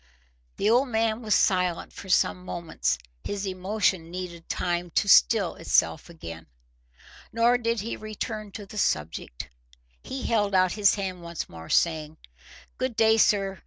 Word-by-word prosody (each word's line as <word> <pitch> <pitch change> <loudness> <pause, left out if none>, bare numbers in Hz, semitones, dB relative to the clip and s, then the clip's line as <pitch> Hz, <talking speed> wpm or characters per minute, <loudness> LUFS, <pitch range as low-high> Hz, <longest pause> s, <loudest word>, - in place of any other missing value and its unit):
The 205 - 0
old 245 +5 +4
man 225 -1 0
was 215 -3 +2
silent 180 -3 +1
for 190 - -10
some 180 0 +2
moments: 115 - -2 0.3
his 200 0 -3
emotion 190 -2 -1
needed 175 -2 -7
time 175 0 -1
to - - +2
still - - +5
itself 80 - +1
again. 85 - -9 0.8
Nor 235 +2 +3
did 230 -2 0
he 225 - -4
return 215 0 -6
to 210 - -7
the 210 +1 -7
subject. 75 - -2 0.5
He 265 -1 -6
held 205 -4 +1
out 185 -1 +4
his 205 0 +3
hand 190 -3 -4
once 170 -1 -5
more, 80 0 -11
saying— 160 -2 +1 0.6
"Good 255 -2 -1
day, 220 0 +4
sir. 195 -3 +2
190 Hz, 150 wpm, -26 LUFS, 170-220 Hz, 0.8 s, still